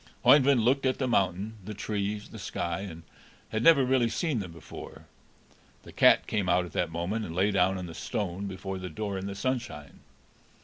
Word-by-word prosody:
Oeyvind 135 -5 +6
looked 135 +2 +3
at 130 - 0
the 130 - -1
mountain, 100 -1 0
the 105 +2 -7
trees, 105 0 -3
the - - -10
sky, 85 0 -3
and 85 -5 -8 0.5
had 110 - -2
never 140 -2 +6
really 125 -2 +2
seen 155 -2 -1
them 90 -4 -6
before. 85 -2 -11 0.8
The - - -12
cat - - +5
came 100 -4 -1
out 90 +1 +3
at 85 - -11
that 85 -2 -1
moment, 90 +7 -2
and 85 -5 -6
lay 100 +3 +2
down 95 0 +2
on 90 - -5
the 85 - -8
stone 95 +3 -3
before 95 0 -5
the 90 0 -6
door 100 +4 -4
in 95 - -5
the 100 - -5
sunshine. 100 - -4
100 Hz, 200 wpm, -28 LUFS, 90-115 Hz, 0.8 s, Oeyvind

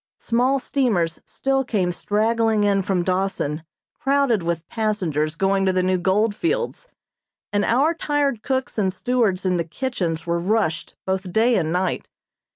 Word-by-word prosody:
Small 250 +4 +1
steamers 220 - 0
still 270 0 0
came 195 -8 0
straggling 220 +3 +1
in 200 -1 +3
from 185 -2 0
Dawson 185 -5 -1 0.4
crowded 270 -6 +2
with 170 -1 -3
passengers 175 -9 -1
going 195 +2 +1
to - - +4
the 185 0 +1
new 185 0 +1
gold 205 +4 +2
fields, 475 - -2 0.7
and 205 0 +2
our 275 +10 +3
tired 290 -7 0
cooks 260 -3 -2
and 190 -2 +2
stewards 205 -1 0
in 180 -1 +2
the 170 - 0
kitchens 170 -4 -3
were 170 0 0
rushed 175 -4 -1
both 190 -1 -2
day 225 +5 +3
and 160 -5 0
night. 180 +2 -1
200 Hz, 155 wpm, -22 LUFS, 180-245 Hz, 0.7 s, to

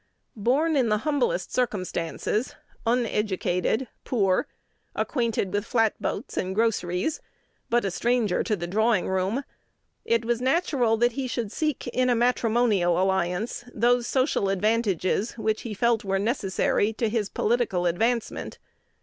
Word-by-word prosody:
Born 275 +9 +1
in 255 -5 +2
the 210 - +3
humblest 465 +12 0
circumstances, 210 -1 -1 0.3
uneducated, 220 -1 0 0.2
poor, 195 -7 +1 0.5
acquainted 230 -7 -1
with 205 0 0
flatboats 225 +1 -1
and 185 +1 -1
groceries, 215 - 0 0.5
but 240 -2 +2
a 195 - -1
stranger 235 -1 +1
to 215 - 0
the 175 -3 -4
drawing 215 +2 +1
room, 190 +8 0 0.6
it 230 0 +1
was 240 0 0
natural 260 -5 +2
that 240 +2 +3
he 260 +2 -3
should 230 -4 -3
seek 305 +3 -2
in 255 +1 +1
a 245 - +3
matrimonial 230 -7 +2
alliance 190 +4 0
those 240 +2 +2
social 255 -7 +1
advantages 205 0 +1
which 220 -1 -1
he 220 -3 -5
felt 235 +1 +2
were 195 -1 0
necessary 205 0 0
to 225 +1 -1
his 215 -2 -1
political 215 -6 0
advancement. 225 +7 -1
225 Hz, 130 wpm, -26 LUFS, 195-245 Hz, 0.6 s, the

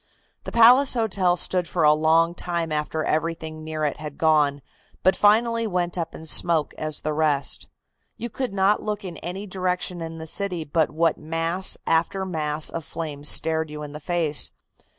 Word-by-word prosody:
The - - -5
Palace 250 +4 +6
Hotel 190 -6 +1
stood 180 -1 0
for 170 -1 -1
a 150 0 +6
long 160 +2 +2
time 170 -2 -3
after 155 +1 -2
everything 160 0 -3
near 155 0 -4
it 150 - -1
had 150 -1 -8
gone, 150 -3 +2 0.4
but 185 - +4
finally 230 +2 +3
went 175 -3 -2
up 170 -2 -4
in 160 - -10
smoke 160 -1 +2
as 155 -1 -3
the 155 - -2
rest. 150 -2 0 0.5
You 235 - -4
could 250 +1 -4
not 195 +1 +2
look 210 -1 -4
in 175 -3 -7
any 185 +6 -6
direction 180 -2 -3
in 165 0 -6
the 160 - -7
city 180 0 -1
but 155 +1 0
what 160 +1 0
mass 165 +4 +1
after 170 +4 0
mass 155 -4 0
of 165 - -5
flame 150 -2 -6
stared 160 +1 +2
you 150 0 -7
in 145 - -8
the 150 - -8
face. 160 -2 0
165 Hz, 180 wpm, -23 LUFS, 155-185 Hz, 0.5 s, Palace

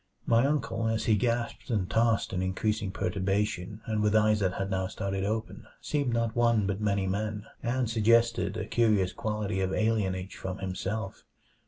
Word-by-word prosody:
My 115 +3 +4
uncle, 140 -6 -1
as 110 0 0
he 110 - +4
gasped 115 +3 -1
and 105 -6 0
tossed 115 0 +1
in 90 - 0
increasing 100 +2 -1
perturbation 100 +1 -1
and 110 -1 -1
with 105 0 +2
eyes 110 0 +4
that 95 -3 +1
had 95 0 -3
now 95 0 0
started 95 0 -3
open, 110 +2 -3
seemed 145 -4 -1
not 115 -1 0
one 115 -3 +3
but 100 +1 -2
many 100 -2 +1
men, 105 +2 -2 0.2
and 125 +1 0
suggested 115 +1 +2
a - - -3
curious 105 -6 +2
quality 105 -2 -2
of 95 -1 +1
alienage 95 -3 0
from 95 0 -5
himself. 95 +2 -4
105 Hz, 170 wpm, -29 LUFS, 95-115 Hz, 0.2 s, My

